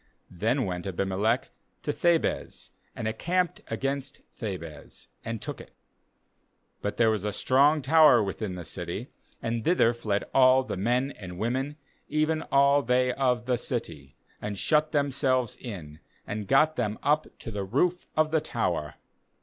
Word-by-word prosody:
60Then 115 +9 0
went 90 -1 -4
Abimelech 100 +6 0 0.3
to 150 - -1
Thebez, 170 0 0 0.2
and 110 - -3
encamped 175 +11 -1
against 135 0 -3
Thebez, 85 -9 -7 0.2
and 115 0 -4
took - - -6
it. - - -16 1.1
51But 105 - -3
there 115 -1 +4
was 105 -3 -1
a 105 - -1
strong 140 +6 +3
tower 150 -4 +6
within 95 -1 -4
the 90 - -6
city, - - -5 0.3
and 115 0 -1
thither 140 -8 +3
fled 105 -4 -1
all 130 0 +6
the - - -4
men 120 +8 +1
and 90 -7 -9
women, 130 +7 -1 0.3
even 155 +1 +1
all 140 +1 +5
they 125 0 +2
of 125 -3 +1
the 125 -1 0
city, 80 - -4 0.3
and 105 -1 -4
shut 155 +7 +2
themselves 135 -4 +1
in, 80 - -8 0.3
and 105 -1 -5
got 155 +4 +4
them 110 -3 -1
up 150 +1 +2
to 115 - -7
the 100 -2 -3
roof 170 - 0
of 155 0 +3
the 160 -1 +2
tower. 75 - -2
125 Hz, 150 wpm, -27 LUFS, 105-140 Hz, 1.1 s, tower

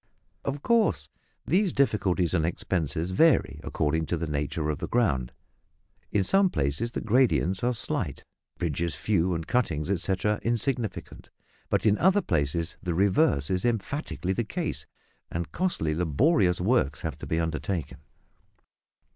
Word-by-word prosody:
Of 140 +1 -3
course 220 - +2 0.4
these 185 +3 +2
difficulties 100 - +1
and 85 -3 +2
expenses 85 0 -1
vary 160 - +3
according 80 +2 -1
to 85 - -1
the 85 - -2
nature 75 +1 -2
of 75 - -5
the - - -3
ground. 70 - +1 0.8
In 100 - +2
some 195 - +4
places 75 - -1
the - - -3
gradients 110 -4 +2
are 125 - +3
slight, 115 - -2 0.3
bridges 85 -1 -2
few, 90 +3 +1
and 80 -1 -4
cuttings, 85 -9 0
etcetera, 95 +3 0
insignificant; 120 -1 -2 0.4
but - - +1
in 105 -1 +4
other 190 +3 +4
places 80 0 -1
the 90 -2 -2
reverse 95 - +2
is 90 -1 0
emphatically 120 - -2
the 120 - -1
case, 110 - -3 0.4
and 85 0 -4
costly 165 - -1
laborious 90 - +2
works 90 - +1
have - - -3
to - - -7
be 80 - 0
undertaken. 80 +1 -3
95 Hz, 140 wpm, -27 LUFS, 80-120 Hz, 0.8 s, some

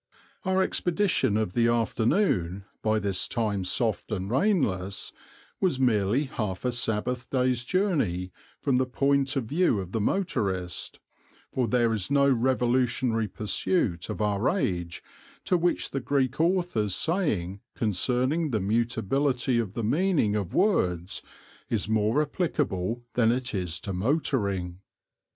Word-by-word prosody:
Our 190 0 +3
expedition 175 - +1
of 110 -5 -1
the 115 +2 +3
afternoon, 115 - +1 0.2
by 110 0 +2
this 100 -3 -1
time 105 -5 -1
soft 110 +4 -1
and 100 -1 -3
rainless, 115 - 0 0.5
was 175 -9 +1
merely 115 0 +2
half 110 -8 -4
a 125 - +2
Sabbath 120 +1 -1
day's 125 -2 +1
journey, 120 - 0 0.3
from 130 -3 +2
the 130 - +1
point 140 +1 +1
of 135 - 0
view 150 - +2
of 95 -2 -6
the 110 - -1
motorist, 100 - -2 0.5
for 125 -2 +1
there 115 0 +2
is 105 -5 -2
no 140 0 +4
revolutionary 125 -2 +1
pursuit 100 - -1
of 105 - -2
our 105 +1 +1
age 90 - -2 0.4
to - - +2
which 175 0 +1
the 135 - -1
Greek 135 +1 0
author's 170 - +1
saying 105 - -1
concerning 125 - 0
the 110 -5 0
mutability 120 +5 +1
of 105 -5 -3
the 115 - -3
meaning 145 - +2
of 100 -5 -3
words 90 - +1 0.5
is 110 -3 0
more 110 +6 +2
applicable 120 - -2
than 115 -2 +3
it 125 +1 -2
is 90 -4 -2
to 100 - -4
motoring. 100 - -1
120 Hz, 135 wpm, -27 LUFS, 100-140 Hz, 0.5 s, no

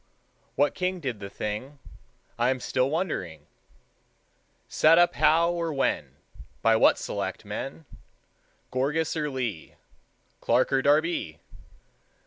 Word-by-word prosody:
What 145 +1 +2
king 185 0 -2
Did 130 -9 -4
the 100 -1 -7
thing, 105 +8 -5 0.6
I 120 +1 +3
am 130 0 0
still 130 +1 0
wondering; 95 - -3 1.2
Set 160 +2 +4
up 175 0 +5
how 160 +3 +3
or 170 -1 -2
when, 135 -2 -1 0.5
By 115 0 +5
what - - +5
selectmen, 145 +4 -5 0.9
Gourgas 150 +6 0
or 150 -2 -1
Lee, 120 - -4 0.6
Clark 130 +2 +1
or 135 - +3
Darby? 145 - +1
140 Hz, 115 wpm, -26 LUFS, 120-160 Hz, 1.2 s, up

